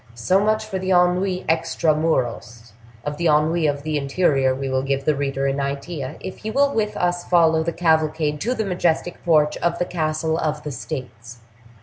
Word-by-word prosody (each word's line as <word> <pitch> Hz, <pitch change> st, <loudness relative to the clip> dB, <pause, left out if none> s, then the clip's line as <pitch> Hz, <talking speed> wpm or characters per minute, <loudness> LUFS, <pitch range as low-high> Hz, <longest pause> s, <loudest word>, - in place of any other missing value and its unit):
So 150 Hz, +12 st, +2 dB
much 215 Hz, +1 st, +1 dB
for 195 Hz, -3 st, -4 dB
the 185 Hz, 0 st, -4 dB
ennui 180 Hz, +1 st, +2 dB
extra 160 Hz, -1 st, +1 dB
muros; 120 Hz, -7 st, -2 dB, 0.3 s
of 145 Hz, 0 st, -3 dB
the 170 Hz, -, 0 dB
ennui 155 Hz, +2 st, +3 dB
of 145 Hz, -1 st, -2 dB
the 155 Hz, -1 st, -1 dB
interior 140 Hz, -2 st, +1 dB
we 135 Hz, +1 st, -4 dB
will 130 Hz, 0 st, 0 dB
give 135 Hz, 0 st, -2 dB
the 155 Hz, -, +3 dB
reader 135 Hz, -1 st, -2 dB
an 135 Hz, +1 st, 0 dB
idea 140 Hz, +1 st, -4 dB
if 190 Hz, -, -7 dB
he 215 Hz, -, -5 dB
will 280 Hz, +4 st, +2 dB
with 215 Hz, -1 st, -1 dB
us 175 Hz, 0 st, 0 dB
follow 165 Hz, -2 st, +3 dB
the 170 Hz, +1 st, -1 dB
cavalcade 155 Hz, -3 st, +1 dB
to 245 Hz, +4 st, 0 dB
the 220 Hz, -, -2 dB
majestic 175 Hz, -2 st, -1 dB
porch 155 Hz, -3 st, +3 dB
of 170 Hz, 0 st, 0 dB
the 180 Hz, -, 0 dB
Castle 160 Hz, -1 st, -1 dB
of 150 Hz, -1 st, -2 dB
the 150 Hz, -, -5 dB
States. 120 Hz, -4 st, -7 dB
155 Hz, 195 wpm, -22 LUFS, 140-175 Hz, 0.3 s, ennui